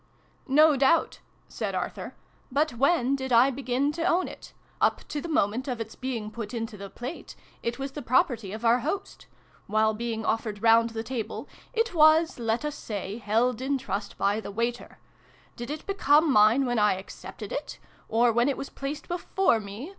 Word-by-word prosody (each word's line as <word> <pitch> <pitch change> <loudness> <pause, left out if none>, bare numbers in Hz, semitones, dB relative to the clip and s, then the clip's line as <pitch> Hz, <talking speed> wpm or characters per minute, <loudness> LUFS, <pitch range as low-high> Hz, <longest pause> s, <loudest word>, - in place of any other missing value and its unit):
" - - -34
No 310 -1 +6
doubt," 280 +5 +2 0.3
said - - -4
Arthur: - - -4 0.2
" - - -35
but 310 - +1
when 275 +1 +2
did 265 -1 -5
I 245 +3 +6
begin 270 +2 0
to 330 +2 -4
own 365 +1 +2
it? - - -11 0.3
Up - - +1
to 295 - -3
the 340 - -6
moment 250 -4 0
of 250 -3 -3
its 225 -1 -5
being 235 -5 -4
put 225 +1 -6
into 225 -2 -4
the 200 -1 -8
plate, 245 - -8 0.3
it 235 +1 -3
was 275 0 -4
the 295 - -6
property 235 -5 +1
of 220 +3 -6
our 235 +2 +5
host: 350 +9 -4 0.4
while 220 +1 +2
being 225 0 -3
offered 220 -2 -2
round 230 0 +5
the 225 0 -5
table, 230 -2 -5 0.2
it 460 -2 0
was, 315 -2 +5
let 230 +4 -1
us 300 - -2
say, 205 -2 -5
held 230 +3 +1
in 275 +1 0
trust 205 -6 -5
by 200 +2 +1
the - - -7
waiter: 235 +4 -3 0.6
did 240 +2 -7
it 300 +1 -5
become 310 -6 +3
mine 215 +5 +5
when 245 -2 0
I 210 -2 +4
accepted 190 +1 -9
it? - - -5 0.3
Or 235 +2 +4
when 240 +4 +3
it 275 - -1
was 275 - -6
placed 280 +2 -5
before 350 -6 +1
me 210 - -8
240 Hz, 190 wpm, -27 LUFS, 220-280 Hz, 0.6 s, No